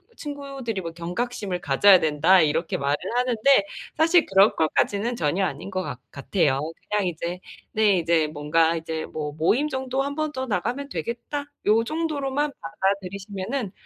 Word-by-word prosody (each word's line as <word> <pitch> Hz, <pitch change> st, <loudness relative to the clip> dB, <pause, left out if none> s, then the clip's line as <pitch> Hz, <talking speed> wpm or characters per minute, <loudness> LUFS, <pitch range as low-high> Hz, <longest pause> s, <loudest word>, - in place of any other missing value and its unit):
친구들이 275 Hz, -, -5 dB
뭐 170 Hz, -, -5 dB
경각심을 180 Hz, +2 st, -3 dB
가져야 185 Hz, +7 st, +6 dB
된다. 160 Hz, +4 st, +4 dB
이렇게 155 Hz, +2 st, 0 dB
말을 140 Hz, +1 st, +1 dB, 0.2 s
하는데 250 Hz, -1 st, +3 dB, 0.3 s
사실 330 Hz, +1 st, +4 dB
그럴 195 Hz, +2 st, +4 dB
것까지는 200 Hz, +8 st, +1 dB
전혀 175 Hz, +1 st, 0 dB
아닌 190 Hz, -, -5 dB
것 185 Hz, -1 st, -2 dB
같 125 Hz, -7 st, -6 dB
같아요. 140 Hz, -1 st, 0 dB, 0.3 s
그냥 210 Hz, -1 st, +1 dB
이제 175 Hz, +1 st, -3 dB, 0.3 s
네, 210 Hz, -4 st, +3 dB
이제 165 Hz, -1 st, +2 dB
뭔가 155 Hz, +2 st, +1 dB
이제 160 Hz, -1 st, -4 dB
뭐 150 Hz, -1 st, -5 dB
'모임 220 Hz, -, +1 dB
정도 265 Hz, -1 st, -2 dB
한 280 Hz, +1 st, -3 dB
번 310 Hz, 0 st, -1 dB
더 260 Hz, -2 st, -4 dB
나가면 245 Hz, +7 st, -2 dB
되겠다.' 265 Hz, +4 st, -4 dB, 0.2 s
이 220 Hz, +2 st, +4 dB
정도로만 295 Hz, -2 st, -1 dB
받아들이시면은 195 Hz, +5 st, -3 dB
200 Hz, 330 characters per minute, -24 LUFS, 165-260 Hz, 0.3 s, 가져야